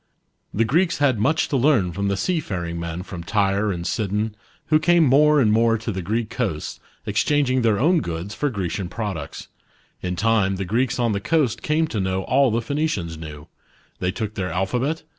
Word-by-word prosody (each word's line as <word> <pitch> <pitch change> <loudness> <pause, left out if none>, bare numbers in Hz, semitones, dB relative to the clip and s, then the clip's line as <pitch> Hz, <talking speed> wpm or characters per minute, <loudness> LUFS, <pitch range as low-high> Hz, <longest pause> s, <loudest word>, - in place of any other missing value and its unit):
The 115 +3 +1
Greeks 170 +9 +2
had 135 -6 +2
much 155 +9 +2
to - - -1
learn 120 -9 +3
from 100 +3 -2
the 100 0 0
seafaring 95 - -2
men 85 +1 -4
from 90 -3 -8
Tyre 100 +2 +1
and 85 -2 -4
Sidon, 105 +2 -1 0.3
who 155 0 +5
came 175 +1 +4
more 150 +2 +5
and 110 -6 +4
more 115 +1 +3
to 110 +1 -4
the 95 -1 -4
Greek 110 +5 -2
coasts, 100 - -3 0.3
exchang 135 +7 +1
ing 130 0 +2
their 110 -3 +2
own 165 +6 +4
goods 85 - -5
for 145 +6 -1
Grecian 95 -4 -3
products. 105 -2 -5 0.5
In 90 0 -2
1 - - -4
time 100 0 +2
the 95 0 -3
Greeks 120 +7 0
on 120 -2 +1
the 100 - -1
coast 145 -4 +1
came 155 +2 +1
to 115 -9 -4
know 95 0 -1
all 140 +5 +3
the 115 +1 -1
Phoenicians 140 - -2
knew: 75 -2 -9 0.5
they 90 - 0
took 105 +2 -4
their 95 -3 -3
alphabet 125 +11 -1
110 Hz, 200 wpm, -22 LUFS, 95-135 Hz, 0.5 s, who